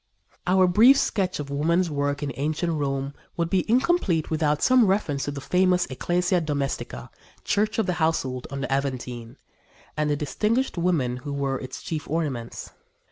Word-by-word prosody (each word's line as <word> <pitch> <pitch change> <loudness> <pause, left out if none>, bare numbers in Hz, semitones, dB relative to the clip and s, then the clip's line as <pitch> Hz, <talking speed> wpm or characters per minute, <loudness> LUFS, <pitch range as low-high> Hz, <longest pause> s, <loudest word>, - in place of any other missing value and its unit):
" - - -33
Our 185 +1 +5
brief 225 +10 +6
sketch 190 - 0
of 140 -1 -5
women's 165 +4 +1
work 145 0 -1
in 140 - -2
ancient 155 +5 -1
Rome 140 -2 -2 0.2
would 170 -1 -1
be 190 +2 +1
incomplete 235 - +2
without 150 -2 +1
some 255 -4 +5
reference 160 -8 0
to 145 - -2
the 140 - -6
famous 180 +4 +2
Ecclesia 180 +6 +1
Domestica 145 -3 -3 0.3
Church 210 +1 0
of 225 - +2
the 180 - 0
Household 130 -6 0
on 140 0 -5
the 135 0 -1
Aventine, 125 -4 -3 0.6
and 150 0 0
the 145 - +2
distinguished 215 - 0
women 165 -9 0
who 145 +3 -7
were 140 -2 -1
its 130 - -8
chief 155 -3 -4
ornaments. 140 -7 -3
155 Hz, 170 wpm, -25 LUFS, 140-180 Hz, 0.6 s, brief